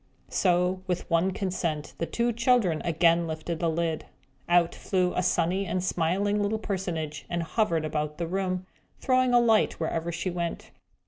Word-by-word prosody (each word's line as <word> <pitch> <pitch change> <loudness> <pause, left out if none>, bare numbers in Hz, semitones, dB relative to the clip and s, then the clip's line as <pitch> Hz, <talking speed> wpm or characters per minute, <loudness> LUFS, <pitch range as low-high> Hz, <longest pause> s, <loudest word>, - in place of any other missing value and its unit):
So, 180 0 +2
with 180 -1 -2
one 170 +3 +3
consent, 175 -6 -3
the 165 - -1
two 235 +8 0
children 230 -8 +2
again 170 0 +3
lifted 160 +1 -4
the 170 - +1
lid. 160 -1 -1 0.4
Out 175 -1 +4
flew 180 -2 0
a - - 0
sunny 180 +2 +1
and 180 +1 -1
smiling 190 +4 +1
little 205 +2 0
personage, 175 -8 -4
and 170 -1 -1
Hovered 165 -4 0
about 150 0 -2
the 170 - -2
room, 185 +1 -2 0.3
throwing 255 -1 +2
a 245 - +6
light 225 -2 +3
wherever 165 +1 -2
she 170 +2 -3
went. 170 -1 -4
175 Hz, 165 wpm, -27 LUFS, 165-195 Hz, 0.4 s, a